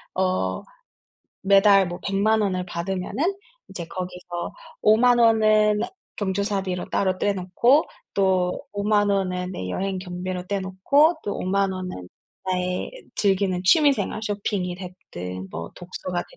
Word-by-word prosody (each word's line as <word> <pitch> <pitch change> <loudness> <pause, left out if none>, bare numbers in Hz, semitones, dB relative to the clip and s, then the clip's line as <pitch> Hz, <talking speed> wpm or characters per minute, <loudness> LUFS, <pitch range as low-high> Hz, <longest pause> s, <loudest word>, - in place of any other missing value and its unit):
어 185 - 0 0.8
매달 195 0 +6
뭐 175 +1 -6
1,000,000 205 +3 +2
원을 185 -3 -1
받으면은 190 - -2 0.3
이제 170 - -6
거기서 180 -1 -6 0.3
'50,000 240 +3 +5
원은 215 -2 +4 0.4
경조사비로 195 -2 -2
따로 185 -2 +1
떼 205 - +1
놓고 200 - +3 0.3
또 185 -2 +1
50,000 205 0 +2
원은 185 -2 -1
내 90 - -5
여행 190 - -2
경비로 180 0 -5
떼 200 - 0
놓고 235 - +3
또 205 - -3
50,000 195 +1 0
원은 180 - -6 0.4
나의 180 -1 -1 0.2
즐기는 190 -2 +1
취미 290 - +6
생활 215 - -3
쇼핑이 200 -3 -2
됐든 95 - -8
뭐 85 -1 -6
독서가 180 0 -4
190 Hz, 220 characters per minute, -24 LUFS, 180-205 Hz, 0.8 s, 매달